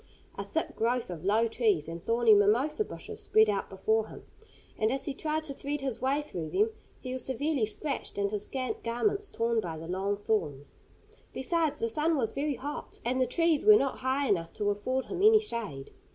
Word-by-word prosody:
A - - -4
thick 320 - -3
growth 235 -2 0
of 165 -3 -7
low 215 +4 +3
trees 215 -9 +1
and 165 +1 -7
thorny 230 -1 +4
mimosa 240 - +3
bushes - - -8
spread 220 0 +4
out 200 - -2
before 220 +3 0
him, - - -11 0.5
and 220 - +1
as 270 +1 -2
he 285 - -2
tried 310 +2 -2
to 295 -3 -4
thread 285 +1 -4
his 265 -5 -3
way 275 +3 +1
through 170 - -5
them 425 +3 +2 0.3
he 255 -1 -5
was 260 -2 -2
severely 265 -2 0
scratched, 275 +4 -3
and 200 0 0
his 210 -1 -3
scant 260 -2 -3
garments 395 - 0
torn 230 0 0
by 170 -6 -4
the 160 +1 -8
long 195 +3 -1
thorns. 170 -10 -2 0.6
Besides 320 +3 0
the 230 - +2
sun 310 +7 +1
was 225 -5 0
very 285 +2 -1
hot, 285 +5 -6
and 255 +2 +1
the 255 - +3
trees 330 +2 +2
were 425 0 +9
not 275 -10 +1
high 265 +2 0
enough 170 -6 0
to 205 0 0
afford 255 +6 -2
him 375 - -4
any 435 +1 +7
shade. 225 - -4
240 Hz, 205 wpm, -29 LUFS, 205-290 Hz, 0.6 s, were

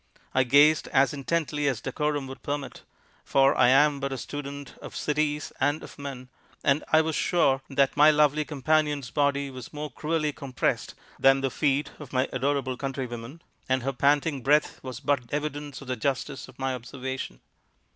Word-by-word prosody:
I 130 - +4
gazed 145 +5 +5
as 135 +2 +3
intently 150 0 -1
as 130 -6 0
decorum 150 +2 -2
would 135 0 -9
permit 145 -2 -4 0.4
for 135 0 +3
I 125 - +5
am 140 +2 +5
but 140 0 -3
a 135 - -3
student 140 0 -7
of - - -9
cities 150 0 -1
and 145 +3 +1
of - - -12
men 135 -3 -7 0.3
and 140 +2 +2
I 160 - +6
was 160 -1 -2
sure 140 -6 +2
that 135 -1 +2
my 150 +1 +7
lovely 150 0 +3
companion's 150 -2 0
body 140 -1 +1
was 130 -2 -9
more 150 -1 -6
cruelly 155 +2 -1
compressed 140 -4 -2 0.2
than 135 0 +5
the 135 -1 -1
feet 145 0 0
of 145 -4 -10
my 130 +1 +2
adorable 130 -1 0
countrywomen, 130 +1 -5 0.3
and 130 -1 +1
her 135 +1 -1
panting 140 +2 +2
breath 150 +4 +2
was 130 -1 -6
but 130 -5 -1
evidence 145 -1 -4
of 135 - -11
the 130 - -1
justice 135 +3 -2
of 125 - -16
my 135 0 -1
observation. 130 - -6
140 Hz, 175 wpm, -27 LUFS, 130-150 Hz, 0.4 s, my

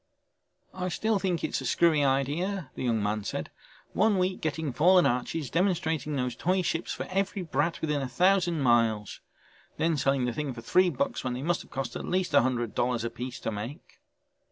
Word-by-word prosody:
"I 185 0 -3
still 220 +3 0
think 180 -4 -1
it's - - -1
a - - -6
screwy 160 -4 +3
idea," 145 +5 0
the - - -4
young 115 -3 +1
man 105 0 -1
said. - - -4 0.4
"One 210 +1 +3
week 185 0 0
getting 155 -3 -2
fallen 180 +6 +5
arches, 125 +4 -1
demonstrating 160 -5 0
those 125 -3 -1
toy 185 +7 +1
ships 165 +1 -2
for - - -3
every 195 0 -1
brat 160 +1 -1
within 150 -2 0
a 135 - -2
thousand 175 +3 +2
miles. 115 -5 +2 0.6
Then 165 -1 +1
selling 135 -1 +1
the 120 - -1
things 145 -3 -3
for 115 - -7
three 180 +10 +3
bucks 275 +6 -2
when 125 -1 -2
they 125 +2 -4
must 175 +1 0
have - - -15
cost 135 0 -4
at - - -4
least 185 -3 -1
a 140 - +7
hundred 120 -3 -1
dollars 120 -1 0
apiece 120 +2 -5
to - - -2
make." 115 +9 -7
150 Hz, 195 wpm, -28 LUFS, 125-180 Hz, 0.6 s, a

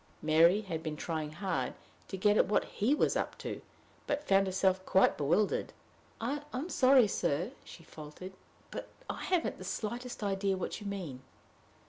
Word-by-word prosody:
Mary 165 +6 +5
had 170 -6 -4
been 155 -1 -4
trying 155 -2 -3
hard 165 -6 -2 0.3
to 190 - -5
get 205 +2 +4
at - - +4
what 210 - +2
he 235 +8 +1
was - - +2
"up - - -2
to," - - -5 0.5
but 295 +1 -2
found 195 0 +4
herself 190 0 +1
quite 190 0 +4
bewildered. 170 +8 +1 0.5
"I 275 +6 -2
am 275 +7 -3
sorry, 260 -6 +6
sir," 175 - -1
she 165 - -12
faltered, 155 +4 -10 0.4
"but - - -6 0.2
I - - -5
haven't 360 -3 0
the - - -7
slightest 240 +1 -4
idea 195 -1 0
what 185 - -4
you 205 - -6
mean." 175 -10 -5
195 Hz, 165 wpm, -32 LUFS, 165-215 Hz, 0.5 s, sorry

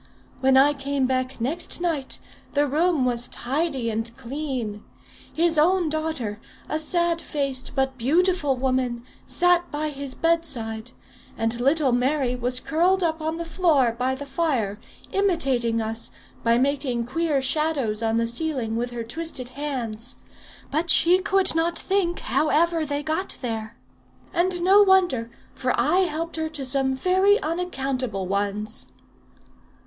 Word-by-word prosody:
When 265 0 +4
I 285 +2 +6
came 280 -1 -1
back 255 0 -1
next 300 +11 -1
night, 325 -6 -1 0.4
the 290 0 +3
room 305 0 +1
was 245 -1 -1
tidy 265 -2 -1
and 225 +1 -3
clean. 255 -5 -4 0.5
His 330 -1 +2
own 350 +1 +3
daughter, 305 -9 -3 0.3
a 310 - -1
sad 340 +1 +1
faced 275 -3 -3
but 265 -1 -1
beautiful 310 +2 +2
woman, 255 -2 -1 0.2
sat 355 0 +2
by 305 +1 -2
his 280 -2 -6
bedside; 250 -9 0 0.5
and 225 +1 -1
little 280 +1 +3
Mary 250 +1 +1
was 250 +1 +1
curled 355 +6 +2
up 320 -1 0
on 320 +1 -2
the 335 - -4
floor 305 -9 +2
by 255 +2 0
the 285 +2 -7
fire, 265 -9 -1 0.3
imitating 270 -13 +1
us, 225 +1 -3 0.3
by 230 0 +3
making 265 -2 0
queer 300 +3 0
shadows 270 -5 0
on 225 0 +1
the 230 0 +2
ceiling 235 -2 -2
with 240 +1 -1
her 240 -1 -5
twisted 260 0 -5
hands. 255 -5 -4 0.6
But 320 +4 0
she 350 +3 +6
could 390 0 +3
not 330 +1 +1
think 380 -3 0
how 305 - +1
ever 330 0 +2
they 290 0 -2
got 320 +6 -1
there. 225 -1 -4 0.6
And 350 0 +1
no 390 +3 +6
wonder, 360 - +3 0.2
for - - -1
I 370 +1 +3
helped 330 +1 -4
her 315 0 -2
to 300 -4 -4
some 265 0 +2
very 375 - +3
unaccountable 270 - -2
ones." 205 +3 0
280 Hz, 145 wpm, -24 LUFS, 245-330 Hz, 0.6 s, I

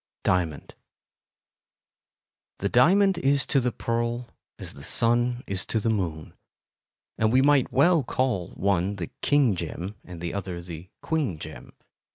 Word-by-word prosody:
Diamond 85 -5 -1 1.8
The 100 - -1
diamond 185 - +4
is 140 -2 +2
to 140 - +2
the 125 -1 0
pearl 120 +1 -2 0.3
as - - -8
the 70 - -12
sun 120 - +2
is 95 0 -2
to 110 - 0
the 115 +1 0
moon, 85 -7 -3 0.9
and 110 0 +3
we 130 +2 +4
might 145 -2 +3
well 165 +3 +4
call 120 -8 -1
one 100 0 0
the 90 -4 -6
"king 140 -8 +3
gem" 90 +3 -5
and 90 -2 -10
the 85 0 -4
other 95 -3 -4
the 85 0 -9
"queen 150 - -1
gem." - - -10
110 Hz, 145 wpm, -26 LUFS, 90-130 Hz, 1.8 s, diamond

